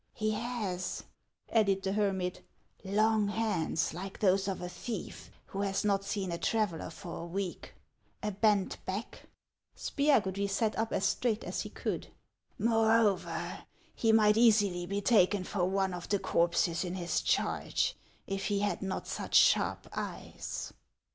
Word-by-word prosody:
" -, -, -44 dB
He 215 Hz, -, +3 dB
has," 215 Hz, -5 st, -3 dB, 0.5 s
added 200 Hz, -4 st, +3 dB
the 190 Hz, -, 0 dB
hermit, 190 Hz, -3 st, 0 dB, 0.3 s
" -, -, -33 dB
long 215 Hz, +2 st, +2 dB
hands 200 Hz, -8 st, 0 dB
like 190 Hz, +3 st, -6 dB
those 195 Hz, -1 st, +3 dB
of 195 Hz, -, -2 dB
a 180 Hz, -, -4 dB
thief 205 Hz, +3 st, -6 dB, 0.2 s
who 195 Hz, -, -4 dB
has 195 Hz, 0 st, 0 dB
not 200 Hz, -1 st, +2 dB
seen 200 Hz, -3 st, -2 dB
a 170 Hz, -, -3 dB
traveller 210 Hz, -9 st, 0 dB
for 170 Hz, +1 st, -8 dB
a -, -, -5 dB
week, 185 Hz, +1 st, -4 dB, 0.5 s
a 210 Hz, -, 0 dB
bent 205 Hz, -1 st, +1 dB
back 195 Hz, +4 st, -5 dB
— -, -, -60 dB
" -, -, -39 dB
Spiagudry 200 Hz, -9 st, +1 dB
sat 215 Hz, +2 st, 0 dB
up 225 Hz, +1 st, -1 dB
as -, -, 0 dB
straight 230 Hz, -3 st, +1 dB
as -, -, -3 dB
he -, -, -6 dB
could. -, -, -3 dB, 0.5 s
"Moreover, 225 Hz, -3 st, +2 dB, 0.3 s
he 225 Hz, -, +2 dB
might 215 Hz, -1 st, +5 dB
easily 205 Hz, -6 st, +4 dB
be 200 Hz, +2 st, -1 dB
taken 200 Hz, -2 st, +4 dB
for 185 Hz, -1 st, -1 dB
one 190 Hz, -1 st, 0 dB
of 175 Hz, -1 st, -7 dB
the 200 Hz, -, +3 dB
corpses 170 Hz, -1 st, +1 dB
in 180 Hz, 0 st, -4 dB
his 175 Hz, -2 st, -1 dB
charge -, -, 0 dB, 0.3 s
if 195 Hz, 0 st, -3 dB
he 200 Hz, -1 st, 0 dB
had 205 Hz, 0 st, 0 dB
not 190 Hz, -1 st, -3 dB
such -, -, -4 dB
sharp -, -, +4 dB
eyes." -, -, -5 dB
200 Hz, 160 wpm, -31 LUFS, 185-215 Hz, 0.5 s, might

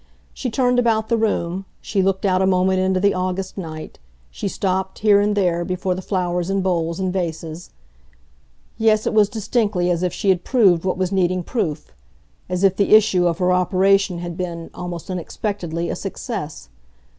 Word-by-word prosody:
She 255 Hz, -, -3 dB
turned 250 Hz, +1 st, +2 dB
about 220 Hz, -2 st, +1 dB
the 230 Hz, -, +3 dB
room; 195 Hz, -4 st, -1 dB
she 200 Hz, -, -1 dB
looked 190 Hz, +1 st, 0 dB
out 185 Hz, -1 st, +2 dB
a 190 Hz, -, +3 dB
moment 185 Hz, 0 st, +2 dB
into 185 Hz, 0 st, +1 dB
the 200 Hz, +1 st, +3 dB
August 185 Hz, +1 st, -3 dB
night; 160 Hz, -4 st, -7 dB, 0.3 s
she 205 Hz, -, -4 dB
stopped, 190 Hz, 0 st, -2 dB
here 205 Hz, -1 st, +6 dB
and 205 Hz, 0 st, +1 dB
there, 175 Hz, -4 st, +1 dB
before 185 Hz, +1 st, -2 dB
the 185 Hz, -, -5 dB
flowers 180 Hz, -2 st, -1 dB
in 195 Hz, 0 st, +1 dB
bowls 170 Hz, -2 st, -1 dB
and 185 Hz, -1 st, -1 dB
vases. 165 Hz, -2 st, -4 dB, 1.1 s
Yes, 220 Hz, -1 st, +3 dB
it -, -, 0 dB
was 210 Hz, -2 st, +4 dB
distinctly 210 Hz, -4 st, 0 dB
as 170 Hz, -1 st, 0 dB
if 180 Hz, -1 st, 0 dB
she 200 Hz, -, -1 dB
had 185 Hz, -2 st, +2 dB
proved 190 Hz, -9 st, +3 dB
what 185 Hz, -, 0 dB
was 185 Hz, 0 st, -1 dB
needing 185 Hz, -1 st, +1 dB
proof, 165 Hz, -, -3 dB, 0.6 s
as 180 Hz, +1 st, -2 dB
if 190 Hz, -1 st, +4 dB
the 205 Hz, +1 st, +5 dB
issue 195 Hz, -5 st, +4 dB
of 170 Hz, -1 st, 0 dB
her 180 Hz, 0 st, +2 dB
operation 190 Hz, +1 st, +2 dB
had 175 Hz, 0 st, -5 dB
been, 170 Hz, -2 st, -5 dB
almost 175 Hz, 0 st, -6 dB
unexpectedly, 175 Hz, -2 st, -3 dB
a -, -, -2 dB
success. 190 Hz, -, -6 dB
185 Hz, 180 wpm, -21 LUFS, 175-200 Hz, 1.1 s, here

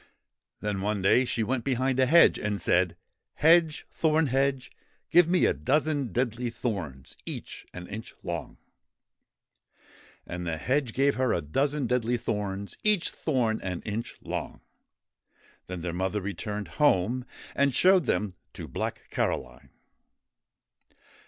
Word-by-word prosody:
Then, 105 Hz, -2 st, -2 dB
one 105 Hz, -1 st, -1 dB
day, 125 Hz, +6 st, +5 dB
she 115 Hz, -2 st, -1 dB
went 120 Hz, +2 st, -1 dB
behind 130 Hz, 0 st, 0 dB
a 130 Hz, -, +4 dB
hedge 170 Hz, +5 st, +6 dB
and 105 Hz, -1 st, -2 dB
said: 90 Hz, 0 st, +2 dB, 0.2 s
' -, -, -57 dB
Hedge, 165 Hz, -2 st, +5 dB
Thorn 160 Hz, 0 st, +2 dB
hedge, 135 Hz, 0 st, 0 dB, 0.4 s
give 175 Hz, 0 st, +6 dB
me 180 Hz, 0 st, +4 dB
a -, -, +3 dB
dozen 145 Hz, -, 0 dB
deadly 120 Hz, +1 st, -1 dB
thorns, 95 Hz, -, -5 dB
each -, -, -8 dB
one 90 Hz, -, -8 dB
an -, -, -11 dB
inch 110 Hz, +2 st, -7 dB
long! -, -, -5 dB, 0.8 s
' -, -, -29 dB
And 90 Hz, 0 st, -5 dB
the 80 Hz, -1 st, -1 dB
hedge 130 Hz, -, 0 dB
gave 140 Hz, +1 st, +3 dB
her 130 Hz, -2 st, +2 dB
a 85 Hz, -, 0 dB
dozen 140 Hz, -, 0 dB
deadly 120 Hz, 0 st, +1 dB
thorns, 100 Hz, -3 st, -3 dB
each 210 Hz, -4 st, +2 dB
thorn 120 Hz, -7 st, 0 dB
an 90 Hz, -2 st, -4 dB
inch 110 Hz, +2 st, -4 dB
long. -, -, -5 dB, 1.1 s
Then 90 Hz, -1 st, -5 dB
their 85 Hz, 0 st, -3 dB
mother 95 Hz, +4 st, -1 dB
returned 105 Hz, 0 st, -4 dB
home, 125 Hz, -2 st, +3 dB, 0.3 s
and 140 Hz, 0 st, +3 dB
showed 185 Hz, +4 st, +4 dB
them 100 Hz, -3 st, 0 dB, 0.2 s
to -, -, -7 dB
Black -, -, -4 dB
Caroline. 65 Hz, +1 st, -2 dB
120 Hz, 145 wpm, -28 LUFS, 95-140 Hz, 1.1 s, hedge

